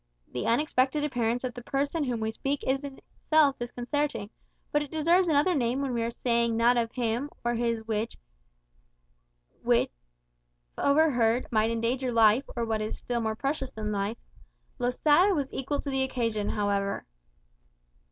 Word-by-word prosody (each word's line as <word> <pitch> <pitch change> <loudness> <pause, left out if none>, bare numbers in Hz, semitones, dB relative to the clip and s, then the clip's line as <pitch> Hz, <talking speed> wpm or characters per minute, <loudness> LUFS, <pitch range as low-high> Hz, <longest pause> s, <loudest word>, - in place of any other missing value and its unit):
The 125 - -2
unexpected 265 +3 +2
appearance 245 -4 0
of 250 -1 -3
the 245 - -8
person 280 +6 -1
of 280 - -1
whom 235 -2 -2
we 220 0 -1
speak 275 +5 -3
is 270 +2 0
in 275 -1 -7
itself 300 -3 +1
disconcerting; 240 -2 -2 0.4
but 295 - +2
it 295 - -5
deserves 335 +4 +3
another 315 +3 +3
name 250 -3 0
when 275 -2 -2
we 235 - 0
are 230 - 0
saying 235 -1 0
that 235 +2 +4
of 230 -1 0
him 240 +3 -1 0.2
or 240 - +2
his 230 -1 -1
which, 220 0 -2 1.5
if - - +3 0.9
overheard, 255 -5 +3
might 220 -1 +2
endanger 240 +3 -1
life, 225 +3 +4
or 235 -1 -1
what 220 -1 -1
is 215 - -5
more 230 -3 -1
precious 275 +2 -2
still 220 -5 -8
than 210 0 -1
life. 200 +3 -2 0.6
Losada 295 +10 +3
was 280 -3 -2
equal 280 +2 -2
to 280 - -4
the 265 0 0
occasion, 230 -5 -1
however. 200 -1 -1
245 Hz, 160 wpm, -28 LUFS, 230-280 Hz, 1.5 s, that